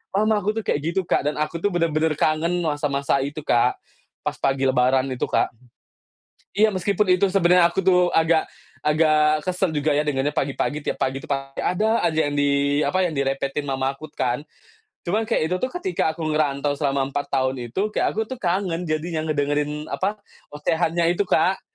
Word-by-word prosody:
Mama 215 +1 +2
aku 205 +2 0
tuh 225 - -2
kayak 145 - +1
gitu, 190 - +1
Kak, 145 - +1
dan 150 - -1
aku 155 +2 -2
tuh 205 - +2
benar-benar 160 -2 +1
kangen 165 +3 +1
masa-masa 145 -2 0
itu, 145 +2 -5
Kak, 120 -1 +2 0.5
pas - - -2
pagi 135 0 0
lebaran 130 +1 +3
itu, 130 - -1
Kak. - - +1 1.1
Iya, 215 +1 +5
meskipun 200 +2 0
itu 180 +2 +3
sebenarnya 180 -2 +4
aku 190 - -1
tuh 180 -1 +4
agak 160 0 +3 0.3
agak 155 0 +3
kesal 185 0 0
juga 150 +1 0
ya 150 - +2
dengarnya 145 0 0
pagi-pagi. 145 +2 -1
Tiap - - -2
pagi 130 +1 0
tuh - - -13
pasti 135 -1 -3
ada 215 +5 +1
aja 160 -2 +1
yang - - -5
di, 140 0 +2
apa? 185 0 +1
Yang 150 -5 -1
direpetin 135 +2 -2
mama 135 0 -1
aku 155 +2 -10
kan. 125 +1 -1 0.7
Cuma 210 +6 +1
kayak 225 -7 0
itu - - +2
tuh 255 - 0
ketika 360 - 0
aku 165 - -4
ngerantau 145 -2 0
selama 140 -2 0
4 145 - -3
tahun 130 -2 -1
itu, 205 - -1
kayak - - +1
aku 220 +1 -1
tuh 260 - -6
kangen 180 -1 -1
jadinya 155 +1 -2
ngedengerin, 150 0 -1
apa? 200 +3 -1 0.4
Ocehannya 165 +3 +1
itu, 190 - +1
Kak. 190 +1 +2
155 Hz, 185 wpm, -23 LUFS, 140-180 Hz, 1.1 s, Iya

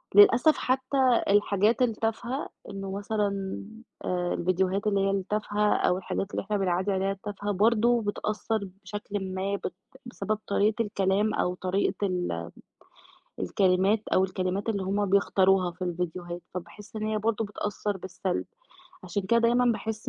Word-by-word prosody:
للأسف 235 +9 +7
حتّى 260 -1 +2
الحاجات 205 +3 +3
التافهة، 230 +3 -1 0.2
إنه 195 -1 -5
مثلًا 200 -1 -2 0.5
آآ، 180 -1 0
الفيديوهات 185 +3 0
اللي 200 -1 +2
هي 195 - +2
التافهة 210 +2 0
أو 180 - +2
الحاجات 195 +1 -3
اللي - - -2
إحنا 205 +1 -1
بنعدّي 190 +1 0
عليها 195 +1 +1
التافهة، 205 +1 -4
برضه 230 +4 +3
بتأثّر 215 +1 -2 0.2
بشكلٍ 205 -2 -4
ما، 195 +2 -1
بت 185 - -4 0.3
بسبب 215 -3 -2
طريقة 210 +3 +2
الكلام 200 +1 +1
أو 180 - 0
طريقة 195 +2 0
ال 85 - -2 0.9
الكلمات، 190 - +2
أو 190 - +5
الكلمات 185 +2 -2
اللي 200 -3 0
هُم 200 +2 0
بيختاروها 190 -1 +3
في 180 +2 -10
الفيديوهات، 175 0 -4
فباحس 205 +4 -8
إن 215 - -3
هي 215 0 0
برضه 225 +1 0
بتأثّر 205 0 -3
بالسلب، 185 0 -3 0.6
عشان 185 +2 -2
كده 235 +5 +3
دايمًا 240 +2 +4
باحس 220 0 -4
200 Hz, 140 wpm, -27 LUFS, 185-215 Hz, 0.9 s, للأسف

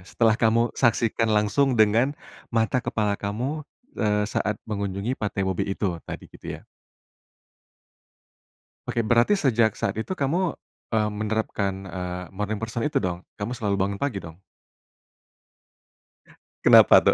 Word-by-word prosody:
setelah 115 -1 +2
kamu 115 +1 +3
saksikan 115 -2 +2
langsung 110 +5 +2
dengan 115 +7 +3 0.3
mata 115 +2 +1
kepala 105 -3 0
kamu, 120 +10 -2 0.4
eee, 105 -1 +2
saat 105 0 -1
mengunjungi 100 +2 -2
pantai 100 -2 -1
mobil 95 0 -1
itu, 95 -4 -2
tadi - - -6
gitu - - -11
ya. - - -23 2.3
Oke, 115 - +1
berarti 120 - +4
sejak 115 - +2
saat 100 - -1
itu 185 +10 -5
kamu, 165 +6 0 0.3
eee, 105 -2 +1
menerapkan, 105 -2 -1
eee, 90 0 -5
morning 105 +2 -2
person 115 +2 -4
itu 150 - 0
dong, 90 -2 -2 0.2
kamu 105 +4 -3
selalu 105 -4 -1
bangun 100 +1 -1
pagi 140 -8 -1
dong? 80 +3 -12 2.2
Kenapa - - +8
tuh? - - +4
110 Hz, 130 wpm, -25 LUFS, 100-120 Hz, 2.3 s, Kenapa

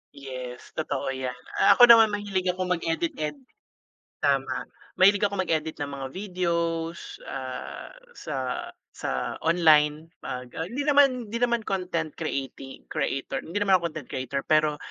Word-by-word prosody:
Yes 130 -3 -8
totoo 140 -3 -2
'yan, 130 -1 -4 0.4
ako 245 - +9
naman 225 -2 +8
mahilig 200 -3 -1
akong 180 0 0
mag-edit-edit. 165 - -2 0.8
Tama, - - 0 0.3
mahilig 200 +2 +6
ako 200 - -1
mag-edit 160 -3 -1
ng 145 - -1
mga 135 -1 -4
videos, 170 -3 -2
ah, 130 -1 -6 0.2
sa 130 - -4 0.3
sa 65 -1 -3
online 160 -1 +4
pag, 125 -1 -6
ah, 165 +1 -4
hindi 275 +6 -2
naman, 275 -4 +4
hindi 235 - -2
naman 235 -2 +2
content 175 -5 -2
creati-creator, 135 -1 -3
hindi 175 +5 -4
naman 190 -2 +5
ako 170 - 0
content 155 -4 -9
creator 130 +2 -3
pero 155 -1 +3
165 Hz, 135 wpm, -26 LUFS, 140-190 Hz, 0.8 s, ako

